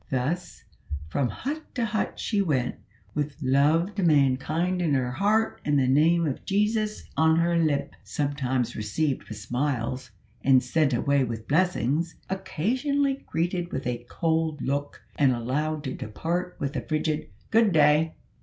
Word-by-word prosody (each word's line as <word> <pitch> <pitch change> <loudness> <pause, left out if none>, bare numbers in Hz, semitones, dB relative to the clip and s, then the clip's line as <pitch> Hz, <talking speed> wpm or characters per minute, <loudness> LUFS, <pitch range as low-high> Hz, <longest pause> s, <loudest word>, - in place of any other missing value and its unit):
Thus, 140 +8 -2 0.5
from 125 - +1
hut 300 +4 -4
to 240 -3 +1
hut 215 0 -2
she 210 -3 0
went, 145 -10 0 0.4
with 150 -1 -2
love 150 +7 +3
to 200 - -2
mankind 155 +3 +2
in 155 -5 +2
her 125 -2 0
heart 210 - +1
and 145 -1 +2
the 135 - +3
name 160 +6 +4
of 140 -4 -3
Jesus 210 +2 0
on 160 0 +4
her 170 +1 +2
lip; 155 -4 +1
sometimes 130 -4 -1
received 130 +7 -1
with 110 - -6
smiles 125 +2 -2 0.3
and 130 -1 +5
sent 155 -4 +2
away 140 +2 +2
with 115 -2 -5
blessings, 165 -1 +1 0.2
occasionally 260 - 0
greeted 175 +1 -1
with 130 - -3
a 120 -1 -2
cold 160 -2 0
look, 145 +2 -3 0.2
and 135 -3 +5
allowed 145 +6 -2
to 130 -3 -3
depart 170 - -3
with 140 +1 -3
a - - -1
frigid 155 -1 -2 0.2
"good 225 -2 +5
day!" 155 0 +4
150 Hz, 150 wpm, -26 LUFS, 130-175 Hz, 0.5 s, and